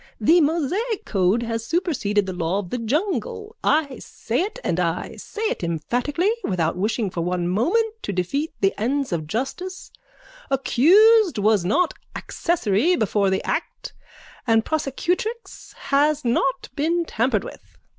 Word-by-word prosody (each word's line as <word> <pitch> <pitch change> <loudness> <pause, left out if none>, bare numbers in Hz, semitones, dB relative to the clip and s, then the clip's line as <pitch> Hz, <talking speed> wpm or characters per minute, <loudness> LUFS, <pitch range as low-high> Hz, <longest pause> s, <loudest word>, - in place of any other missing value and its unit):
The 330 +11 +5
Mosaic 360 - 0
code 195 +4 +1
has 230 -1 -3
superseded 230 - 0
the 190 - -4
law 175 +1 -1
of 195 -4 -5
the 250 - -2
jungle. 420 - -2
I 290 -4 +1
say 235 +6 -3
it 425 +6 -3
and 170 - -1
I 175 0 -2
say 440 - -7
it 435 - -1
emphatically, 245 - 0
without 170 -4 0
wishing 210 +2 -1
for 170 - -3
one 175 0 -1
moment 430 - 0
to - - -3
defeat 240 - -2
the 195 -1 +3
ends 270 +3 0
of 155 -3 -3
justice, 315 - -4 0.6
accused 365 - +5
was 210 -2 +3
not 320 - +1 0.2
accessory 330 - +1
before 205 - +1
the 190 - 0
act - - -4 0.5
and 225 -1 +3
prosecutrix 355 - -3
has 285 +1 +1
not 250 +3 0
been 335 +4 0
tampered 230 -6 0
with. - - -12
260 Hz, 145 wpm, -23 LUFS, -, 0.6 s, The